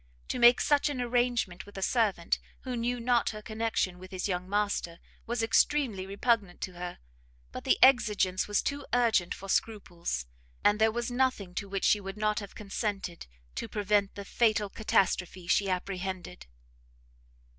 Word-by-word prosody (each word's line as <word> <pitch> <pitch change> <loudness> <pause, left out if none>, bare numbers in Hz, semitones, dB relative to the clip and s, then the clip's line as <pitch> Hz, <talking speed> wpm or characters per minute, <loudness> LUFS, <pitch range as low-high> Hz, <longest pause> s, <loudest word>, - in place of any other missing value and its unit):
To - - -2
make 240 0 +7
such 290 0 +3
an 280 -3 -3
arrangement 240 -7 0
with 205 - -12
a 195 - -3
servant 205 -7 +1 0.2
who 255 -2 -4
knew 240 +1 -1
not 240 0 +2
her 215 -1 -7
connection 220 -5 -1
with 185 0 -11
his 185 0 -3
young 180 -1 -3
master, 200 -4 -1 0.3
was 235 0 -1
extremely 225 -4 +2
repugnant 200 -2 0
to 185 - -3
her; 175 0 -6 0.5
but - - -8
the - - +3
exigence 210 -8 +4
was 205 0 +1
too 285 0 -2
urgent 230 -8 +2
for 195 - -10
scruples, 175 - -2 0.4
and 205 +1 +4
there 220 0 +5
was 240 +2 -3
nothing 245 -7 0
to 200 +2 -4
which 195 -1 -2
she 210 - +4
would 195 +1 -7
not 210 0 +1
have 200 -2 -9
consented, 200 -3 -4 0.3
to - - -4
prevent 205 -1 +1
the 200 - -7
fatal 215 -2 +2
catastrophe 185 -4 0
she 195 +3 +2
apprehended. 185 - -4
205 Hz, 165 wpm, -29 LUFS, 185-235 Hz, 0.5 s, make